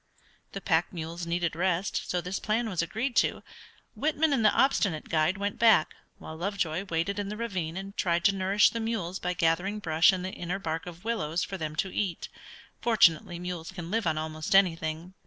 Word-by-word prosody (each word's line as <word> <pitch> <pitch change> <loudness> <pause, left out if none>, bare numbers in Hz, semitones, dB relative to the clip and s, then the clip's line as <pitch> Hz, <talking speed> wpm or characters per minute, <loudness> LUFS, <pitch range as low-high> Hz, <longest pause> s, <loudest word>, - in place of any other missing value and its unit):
The 195 - -5
pack 165 -2 +1
mules 170 0 -6
needed 170 -1 -1
rest, 180 +2 0
and - - -10
so 180 - 0
this 180 +3 -4
plan 225 +2 0
was 185 -6 -1
agreed 230 +9 -2
to. - - +2 0.5
Whitman 310 0 +1
and 245 -5 +1
the 210 - +6
obstinate 200 - +1
guide 160 +3 +2
went 200 +1 -3
back, 220 -8 +5 0.2
while 160 - -9
Lovejoy 180 0 -2
waited 190 +3 -1
in 200 -1 -3
the 210 - -5
ravine 185 -8 -3
and 195 +1 -7
tried 170 -2 +1
to 200 - +5
nourish 195 +2 +3
the 230 - -3
mules 220 -5 -2
by 180 0 -2
gathering 175 +5 +1
brush 165 -4 +4
and 185 -1 -3
the 190 - -4
inner 175 +2 -3
bark 165 -3 -4
of 175 +3 -10
willows 170 -8 -1
for 195 - -5
them 155 -1 -4
to 190 +4 -2
eat. 185 -5 -2 0.5
Fortunately 190 -5 +3
mules 175 -1 -5
can 175 -2 -7
live 225 -3 0
on 155 -1 +1
almost 155 +3 -2
anything. 165 -2 +2
180 Hz, 200 wpm, -28 LUFS, 165-200 Hz, 0.5 s, the